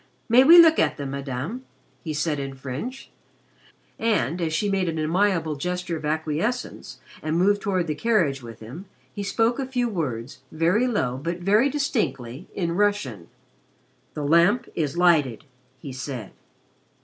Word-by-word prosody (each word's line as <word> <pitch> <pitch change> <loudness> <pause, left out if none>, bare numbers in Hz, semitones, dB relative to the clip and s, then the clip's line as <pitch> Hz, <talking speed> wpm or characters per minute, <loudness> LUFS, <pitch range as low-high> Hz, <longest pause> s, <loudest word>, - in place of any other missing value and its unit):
"May 240 +3 +6
we 330 +5 +9
look 325 -1 +7
at - - +2
them, 140 -2 -5
Madame?" 140 - -5 0.4
he 160 - -4
said 155 0 -1
in 135 -1 -5
French, 140 - -6 0.9
and, 195 -7 0
as 165 -2 -1
she 185 +6 0
made 190 -3 0
an 160 - -3
amiable 165 0 +1
gesture 180 +3 -3
of 155 -1 -6
acquiescence 160 - -2 0.2
and 155 +1 -1
moved 205 +3 +3
toward 185 -3 0
the 155 - -2
carriage 160 - +1
with 115 -2 -11
him, 130 - -9 0.3
he 205 - -5
spoke 225 +5 +1
a 265 - -2
few 250 -2 0
words, 135 - -4
very 175 +10 +2
low 130 - -1
but 170 +3 -3
very 210 +9 +3
distinctly, 165 - -2
in 170 -3 -1
Russian. 170 - 0 0.9
"The 150 - -3
Lamp 170 - +4
is 150 -1 -2
lighted," 155 -10 +3 0.3
he 135 -1 -8
said. 130 -5 -6
170 Hz, 155 wpm, -24 LUFS, 140-205 Hz, 0.9 s, we